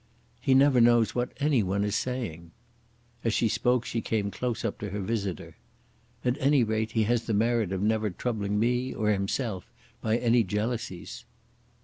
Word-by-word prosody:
"He 130 - +2
never 135 -2 +5
knows 120 -1 +4
what 125 0 -1
any 140 -4 +3
one 100 +1 0
is 105 0 -1
saying." 110 -11 -3 0.7
As 115 -1 +1
she 115 - +2
spoke 125 +2 +1
she 115 - -2
came 105 -3 -1
close 120 +2 -3
up 110 - -3
to 105 - -4
her 100 +2 -4
visitor. 100 -3 -3 0.7
"At 125 +2 +1
any 140 -1 +4
rate 110 0 -1
he 110 - +2
has 120 +2 0
the 110 - 0
merit 115 -2 +1
of 95 0 -2
never 110 0 +1
troubling 105 0 -2
me 125 +3 0
or 105 0 +1
himself 100 0 -2 0.3
by 110 +1 +1
any 120 -1 +3
jealousies." 105 -1 -4
110 Hz, 170 wpm, -28 LUFS, 105-120 Hz, 0.7 s, never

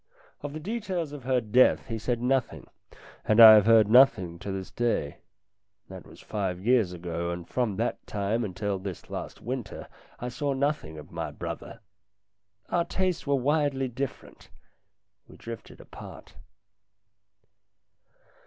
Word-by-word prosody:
Of 145 -1 -6
the 155 - -5
details 185 -4 -3
of 145 -4 -9
her 130 -1 +2
death 120 +3 +3
he 115 -3 -5
said 120 +2 -2
nothing, 130 0 0 0.6
and 110 +1 +2
I 110 -1 +12
have 105 -1 +5
heard 110 -2 +6
nothing 105 -8 +4
to 100 - -5
this 95 -1 -6
day. 115 -12 -1 0.7
That - - -10
was - - -15
five 95 -4 -3
years 110 -2 +2
ago, 85 -1 -4
and 85 0 -5
from 120 -6 -1
that 115 +4 -3
time 105 +3 -1
until 100 0 -3
this 95 -2 -8
last - - -6
winter 120 -3 -5 0.3
I 125 - -4
saw 140 +2 -2
nothing 135 - -2
of 75 - -11
my - - -4
brother. - - -7 0.9
Our 170 -1 +1
tastes 185 -4 -2
were 140 - +3
widely 140 -1 0
different 130 +2 -7 0.8
we - - -15
drifted 115 -1 -9
apart. - - -12
115 Hz, 145 wpm, -27 LUFS, 100-135 Hz, 0.9 s, I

